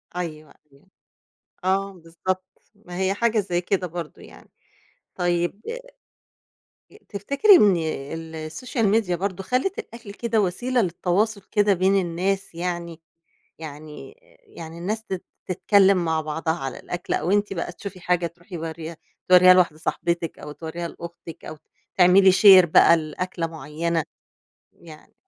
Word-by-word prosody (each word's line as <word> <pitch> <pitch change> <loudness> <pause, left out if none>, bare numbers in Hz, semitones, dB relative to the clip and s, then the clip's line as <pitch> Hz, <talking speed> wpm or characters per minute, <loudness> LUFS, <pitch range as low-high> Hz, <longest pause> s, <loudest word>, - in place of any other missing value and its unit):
أيوه 155 -4 -6 0.2
أيوه، 140 +6 -24 0.8
آه 195 +1 0
بالضبط 180 +2 -4 0.3
ما 180 -4 -10
هي 190 0 +1
حاجة 225 +1 +1
زي 180 -3 -1
كده 185 0 -1
برضو 170 -2 -8
يعني. - - -16 0.7
طيب 175 +3 -1 1.3
آآ 420 - -16
تفتكري 280 - +4
إن 205 - +5 0.6
السوشيال 205 - -2
ميديا 200 -4 +1
برضو 195 +1 -3
خلّت 255 - -1
الأكل 235 - -9
كده 230 +1 0
وسيلة 240 +7 0
للتواصل 200 +3 0
كده 205 -2 +3
بين 190 +2 +2
الناس، 185 +2 -2
يعني 170 -1 -4 0.6
يعني 155 - -10 0.3
يعني 165 - -11
الناس 215 +6 -3
تت 190 -4 -5 0.2
تتكلم 190 0 +3
مع 160 -1 0
بعضها 160 +1 -2
على 135 -6 -6
الأكل 175 0 -5
أو 160 +4 -1
أنتِ 205 0 +1
بقى 170 -2 -4
تشوفي 190 +1 -9
حاجة 180 -1 0
تروحي 175 +2 -10
مُورّياها 165 0 -6 0.3
تورّيها 185 0 +8
لواحدة 175 -4 +2
صاحبتِك، 170 0 -2
أو 150 - -8
تورًيها 170 +2 -6
لأختِك، 170 -1 -10
أو - - -8 0.4
تعملي 190 +1 +6
شير 190 -2 +8
بقى 170 +1 +6
لأكلة 165 +2 -4
معينة؟ 165 0 -3 0.7
يعني 155 -3 -15
180 Hz, 135 wpm, -23 LUFS, 165-200 Hz, 1.3 s, تورّيها